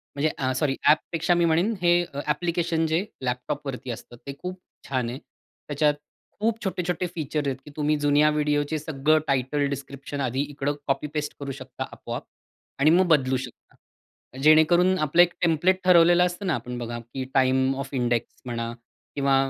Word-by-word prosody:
म्हणजे 150 +2 +1
अ, 130 -1 0
सॉरी 140 -3 +1
ॲपपेक्षा 165 +2 +2
मी 170 0 +3
म्हणेन 170 +8 +2
हे 175 0 +4 0.2
ॲप्लिकेशन 165 +1 0
जे 165 +4 +1 0.2
लॅपटॉपवरती 125 +1 -3
असतं 120 +1 -9
ते 140 - -4
खूप 180 0 -6 0.3
छान 130 -3 -1
आहे. 130 +3 -6 0.5
त्याच्यात 150 0 +2 0.5
खूप 225 +1 -1
छोटे-छोटे 180 -2 -2
फीचर्स 150 -2 -2
आहेत 135 -1 -1
की 150 - -11
तुम्ही 150 0 +1
जुन्या 145 +1 +4
व्हिडिओचे 150 0 0
सगळं 155 +1 +2
टायटल 140 +2 +1
डिस्क्रिप्शन 140 0 -6
आधी 130 +1 0
इकडं 145 0 -2
कॉपी 140 +2 0
पेस्ट 150 -1 -2
करू 140 -1 -4
शकता 130 -1 -6
आपोआप - - -6 0.6
आणि 150 - +5
मग 185 +2 +5
बदलू 135 -5 +3
शकता. 125 -2 -10 0.7
जेणेकरून 175 +4 +5
आपलं 155 +3 +4
एक 175 0 +4
टेम्प्लेट 175 +3 +2
ठरवलेलं 175 0 +6
असतं 180 +3 -4
ना 160 - +2
आपण 125 +1 -6
बघा 120 0 -5
की 120 +3 -6
टाइम 130 0 +3
ऑफ 135 0 -6
इंडेक्स 120 -2 -1
म्हणा 115 -1 -3 0.4
किंवा 140 -1 +2
150 Hz, 165 wpm, -25 LUFS, 135-170 Hz, 0.7 s, ठरवलेलं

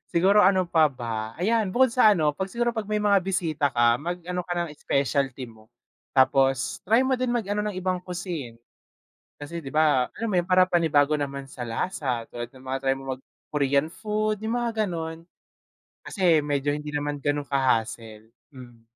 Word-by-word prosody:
Siguro, 195 +5 +5
ano 190 -2 +5
pa 160 -2 +5
ba? 115 -4 -5
Ayan, 210 +2 +1
bukod 260 -1 +4
sa 220 -3 +6
ano, 155 -3 +2
'pag 190 +6 -4
siguro, 240 +3 -1
'pag 220 -3 -4
may 210 0 -1
mga 200 -1 +4
bisita 165 -6 0
ka, 120 +1 +3
mag-ano 180 +2 -4
ka 175 - -3
ng 170 -2 -2
specialty 135 -1 -1
mo. 110 -1 -18 0.5
Tapos 130 -2 +2
try 230 +4 +4
mo 260 -1 0
din 250 -1 0
mag 230 - 0
ano 210 - 0
ng 205 - -4
ibang 185 -1 -1
cuisine. 175 -9 -6 0.9
Kasi 170 +4 -6
'di 135 - -8
ba, 150 -5 +3
alam 230 - -4
mo 190 - -1
yun, 175 - +1
para 185 0 +4
panibago 150 -3 +3
naman 140 -1 -5
sa 125 -2 -7
lasa 120 -1 -3
tulad 120 +1 -7
ng 130 - -15
mga 130 +1 -2
try 135 - +3
mo 135 -1 -5
mag-Korean 140 +2 -2
food, 215 +2 -2
yung 225 - -1
mga 225 -2 0
gano'n. 165 -2 -5 0.8
Kasi 170 -6 +2
medyo 145 0 0
hindi 150 0 -6
naman 145 -1 -3
ganun 145 -1 -1
ka-hassle. 115 -4 -1 0.2
Mm. 120 -3 -13
155 Hz, 180 wpm, -25 LUFS, 135-185 Hz, 0.9 s, sa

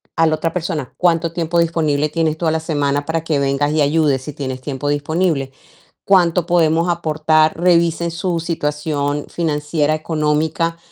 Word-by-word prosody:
A 165 - +3
la 155 - +2
otra 165 +1 -2
persona: 160 -6 -3
"¿Cuánto 170 -2 +1
tiempo 170 0 0
disponible 155 -3 +1
tienes 160 -1 0
tú 170 - -3
a - - +3
la 160 - 0
semana 145 -2 -1
para 160 0 -2
que 155 -3 0
vengas 140 +1 0
y 155 - +2
ayudes, 145 -2 +2
si 150 +2 -7
tienes 130 -3 -5
tiempo 145 +1 -4
disponible? 145 -1 0 0.5
¿Cuánto 180 -3 +3
podemos 170 -1 +2
aportar? 155 -1 +1
Revisen 170 -1 +2
su 170 0 -2
situación 150 -3 -2
financiera, 150 -1 0
económica, 155 +1 -1
155 Hz, 160 wpm, -18 LUFS, 145-170 Hz, 0.5 s, A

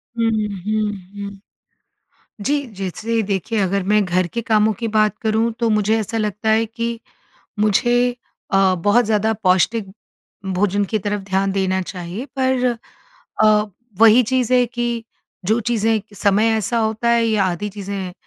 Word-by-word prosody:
हुँ, 230 -1 +1
हुँ, 210 0 -1 0.2
हुँ। 200 -1 -7 1.0
जी, 285 +5 0
जैसे 215 +3 -3
देखिए, 200 +3 -2
अगर 195 0 0
मैं 210 +2 +3
घर 180 0 +1
के 235 - -1
कामों 215 -1 +2
की 230 - -2
बात 215 -1 +1
करूँ 225 +1 +1
तो 230 -1 +1
मुझे 215 +1 +2
ऐसा 225 +2 -3
लगता 210 0 -1
है 220 +1 +3
कि, 230 +1 -4 0.6
मुझे 240 +4 +2 0.4
अ, 195 -1 +4
बहुत 205 +7 +2
ज़्यादा 220 0 +1
पौष्टिक 195 +4 +2 0.7
भोजन 205 +1 +1
की 215 +2 -1
तरफ़ 205 +1 -2
ध्यान 195 0 0
देना 190 -1 0
चाहिए 180 +6 -6
पर 260 -1 +1 0.8
अ, 210 -1 +5 0.4
वही 225 +2 +7
चीज़ 255 +1 0
है 250 -1 +5
कि 240 -1 -3 0.4
जो 220 +4 +2
चीज़ें 225 -1 +1 0.2
समय 205 +3 +3
ऐसा 230 +2 -1
होता 220 +1 0
है 235 0 +3
या 215 -3 +2
आधी 185 +3 -2
चीज़ें 195 -2 -5
215 Hz, 150 wpm, -20 LUFS, 200-230 Hz, 1.0 s, वही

